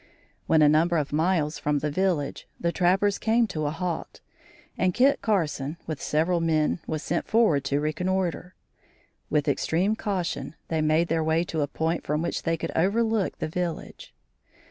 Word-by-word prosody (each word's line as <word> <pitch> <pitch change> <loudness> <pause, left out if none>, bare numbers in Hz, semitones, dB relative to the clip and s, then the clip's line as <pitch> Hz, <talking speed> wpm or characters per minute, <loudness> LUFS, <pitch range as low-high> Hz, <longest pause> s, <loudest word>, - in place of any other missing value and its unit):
When 160 -1 +5
a - - +7
number 165 +3 +3
of 145 -2 -2
miles 160 -1 +1
from 150 0 0
the 150 +1 -2
village, 170 -4 -1
the 170 - 0
trappers 195 +3 +2
came 230 +2 +3
to 155 -5 -2
a - - +1
halt, 170 +1 -4 0.6
and 185 -1 0
Kit 275 +3 +4
Carson 155 -8 -1
with 155 -3 -5
several 165 +3 +1
men 160 0 +1
was 155 -1 -3
sent 170 - -2
forward 215 -12 +3
to 140 +1 +1
reconnoitre. 180 +3 -2 0.7
With 150 -1 +1
extreme 170 +8 +1
caution 175 -9 -3
they 160 -1 0
made 155 +2 +2
their 165 0 0
way 160 +1 +2
to 160 -3 -3
a 145 - 0
point 160 +3 -2
from 150 +2 -1
which 170 - -2
they 165 -1 0
could - - -4
overlook 215 +3 +1
the - - -3
village. 170 0 -5
165 Hz, 170 wpm, -26 LUFS, 155-185 Hz, 0.7 s, a